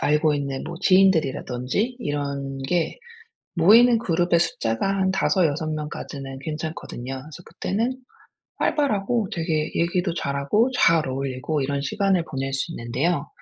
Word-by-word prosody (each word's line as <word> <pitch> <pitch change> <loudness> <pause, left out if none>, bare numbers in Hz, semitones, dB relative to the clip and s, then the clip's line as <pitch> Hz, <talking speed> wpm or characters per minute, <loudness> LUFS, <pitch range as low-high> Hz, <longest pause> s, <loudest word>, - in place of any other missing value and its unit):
알고 150 +1 +2
있는 140 -2 -3
뭐 - - -6
지인들이라든지 185 - +2
이런 140 - -3
게 175 - 0 0.6
모이는 225 +7 +6
그룹의 175 -5 +2
숫자가 115 -2 0
한 195 -1 +1
5 185 -2 +2
6 155 +2 -2
명까지는 140 -3 -6
괜찮거든요. 150 -4 -5
그래서 155 +5 -11
그때는 230 +7 -2 0.6
활발하고 230 - 0
되게 160 -2 -1
얘기도 175 +1 0
잘하고 140 - +1
잘 165 -4 +4
어울리고 135 +3 -2
이런 140 +1 -1
시간을 185 +5 +1
보낼 135 0 -3
수 135 +5 -2
있는데요. 140 +5 -1
160 Hz, 310 characters per minute, -24 LUFS, 140-190 Hz, 0.6 s, 모이는